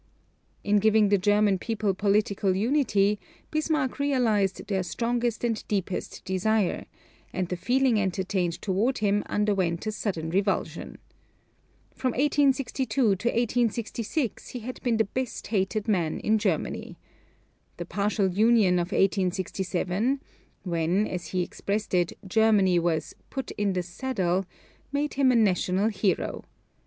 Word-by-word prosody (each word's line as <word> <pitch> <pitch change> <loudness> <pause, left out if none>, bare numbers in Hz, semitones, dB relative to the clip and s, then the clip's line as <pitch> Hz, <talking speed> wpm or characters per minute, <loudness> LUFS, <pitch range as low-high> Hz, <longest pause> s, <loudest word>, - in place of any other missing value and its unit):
In 205 +1 +3
giving 215 0 +4
the 200 -1 +3
German 205 0 +3
people 215 -2 -1
political 200 -1 +1
unity 210 -3 +2 0.3
Bismarck 310 -4 0
realized 230 -9 +1
their 195 -2 -1
strongest 235 +5 -1
and 230 -2 -1
deepest 195 -3 -3
desire; 195 +1 0 0.4
and 185 -1 -2
the 180 - -2
feeling 245 +4 +2
entertained 185 -2 -1
toward 210 +7 +1
him 205 -1 +1
underwent 195 -5 0
a 215 - -1
sudden 170 -7 -3
revulsion. 195 +2 -1 1.0
From 255 -2 -1
1862 275 -3 +1
to 230 - +5 0.2
1866 235 +2 -1
he 250 - -6
had 250 +3 -7
been 235 -3 +1
the 220 - +4
best 250 +2 -4
hated 205 +1 -1
man 175 -7 0
in 220 0 +2
Germany. 190 -7 -2 0.8
The 175 - -5
partial 200 +2 0
union 205 -2 +4
of 175 +3 -2
1867 190 +5 0 0.4
when, 175 +3 +1
as 180 -3 -5
he 180 -1 -1
expressed 205 +4 -3
it, 175 -2 +2
Germany 200 -3 +4
was 165 -2 -1 0.2
"put 265 - -5
in 205 -2 -1
the 180 -1 -1
saddle" 185 -2 -1 0.4
made 290 +1 -1
him 270 -2 +3
a - - +2
national 195 -1 +2
hero. 200 -2 -1
205 Hz, 130 wpm, -26 LUFS, 185-235 Hz, 1.0 s, to